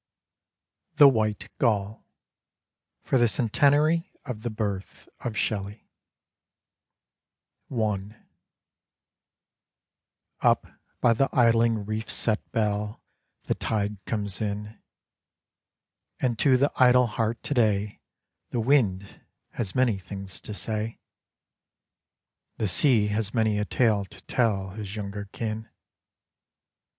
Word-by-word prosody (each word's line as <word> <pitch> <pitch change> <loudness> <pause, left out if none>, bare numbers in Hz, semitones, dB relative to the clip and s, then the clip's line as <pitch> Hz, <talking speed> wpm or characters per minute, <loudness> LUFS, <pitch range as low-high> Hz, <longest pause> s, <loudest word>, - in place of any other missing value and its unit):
THE 145 - +9
WHITE 110 -5 +1
GULL 105 -3 0 1.0
For 130 - +2
the 120 - +5
Centenary 145 - +2
of 125 -6 -5
the 120 - -3
Birth 100 -3 -4
of 115 -3 -4
Shelley 100 +1 -3 1.8
I 105 -3 -2 2.3
Up - - +3 0.4
by 120 - +5
the 135 +4 +1
idling 115 -3 +3
reef 110 +1 -4
set 110 -2 -1
bell 105 -1 -1 0.4
The - - 0
tide 105 -2 -2
comes 100 -3 -3
in; 105 +1 -4 1.4
And 120 -4 0
to 130 +2 +5
the 140 +3 +2
idle 125 0 +6
heart 115 0 -2
to - - -2
day 105 -4 +1 0.5
The 120 - -2
wind 110 -7 +1 0.3
has 105 -6 -4
many 120 -6 +2
things 95 +1 -7
to 105 - -7
say; 110 +1 -3 1.6
The 110 - 0
sea 110 - +3
has 105 0 -2
many 110 -2 +2
a 105 - 0
tale 105 -3 +2
to 95 0 -14
tell 100 -3 0
His 105 0 -7
younger 100 -1 -5
kin. 110 +2 -5
110 Hz, 105 wpm, -26 LUFS, 105-120 Hz, 2.3 s, THE